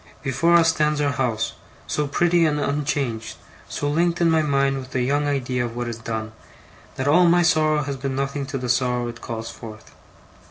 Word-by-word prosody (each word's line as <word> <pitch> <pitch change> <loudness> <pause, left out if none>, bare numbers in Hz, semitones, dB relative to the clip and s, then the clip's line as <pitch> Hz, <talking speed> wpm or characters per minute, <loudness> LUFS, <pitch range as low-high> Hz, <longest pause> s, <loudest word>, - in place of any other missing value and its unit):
Before 145 +6 +2
us 165 -1 +5
stands 150 -1 +1
our 145 -1 +1
house, 120 -4 -1 0.3
so 150 -1 -1
pretty 175 +4 +2
and 150 -1 0
unchanged, 140 -6 -2 0.3
so 145 - -3
linked 170 +3 +1
in 170 -1 +3
my 160 -1 +3
mind 140 -2 +1
with 130 -1 -9
the 125 - +1
young 145 +3 +1
idea 130 -3 -1
of 120 -1 -5
what 120 0 -3
is 115 -1 -5
gone, 110 -1 -4 0.6
that 130 - -2
all 175 +5 +5
my 175 +1 +4
sorrow 155 -2 +3
has 140 -1 -4
been 135 0 -3
nothing 140 0 -2
to 135 0 -3
the 125 -1 -4
sorrow 125 0 +1
it 115 0 -10
calls 115 -1 -5
forth. 110 -2 -11
140 Hz, 200 wpm, -23 LUFS, 125-150 Hz, 0.6 s, us